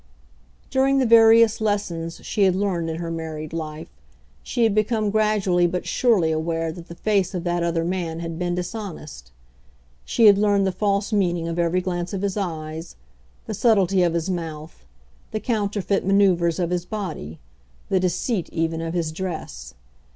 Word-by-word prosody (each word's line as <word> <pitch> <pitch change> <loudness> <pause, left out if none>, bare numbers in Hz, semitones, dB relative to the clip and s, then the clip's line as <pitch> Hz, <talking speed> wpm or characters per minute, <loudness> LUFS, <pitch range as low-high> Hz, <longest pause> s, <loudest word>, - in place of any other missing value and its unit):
During 270 +1 +3
the 265 - +3
various 225 -1 +6
lessons 175 -6 -2
she 210 - -2
had 190 -2 +4
learned 185 -4 -1
in 160 - -3
her 165 0 -4
married 160 -1 -5
life, 155 -1 -5 0.5
she 240 - -1
had 225 -3 +3
become 215 0 +1
gradually 205 -5 +2
but 180 +1 -3
surely 205 -10 +2
aware 165 +1 -1
that 170 +1 -11
the 170 - -10
face 195 -1 0
of 175 - -3
that 175 -1 -1
other 170 -1 0
man 170 -2 -3
had 165 -1 -5
been 175 0 -1
dishonest. 180 - -7 0.7
She 230 - +2
had 200 -2 +7
learned 205 -1 +3
the 190 - +1
false 200 +2 -1
meaning 175 -4 +1
of 170 +1 -3
every 170 +2 +1
glance 175 0 -3
of 195 0 -3
his 200 -2 -1
eyes, 160 -4 -5 0.5
the 220 - -4
subtlety 195 -3 +3
of 170 -1 +2
his 170 +1 -1
mouth, 165 - -6 0.4
the 215 - -3
counterfeit 205 -3 -1
manoeuvres 185 -4 +3
of 175 -1 -1
his 175 -1 -1
body, 175 - -6 0.5
the 190 - +2
deceit 185 +2 -1
even 165 0 -1
of 165 +1 -4
his 165 -3 -1
dress. 155 - -6
180 Hz, 170 wpm, -23 LUFS, 165-205 Hz, 0.7 s, had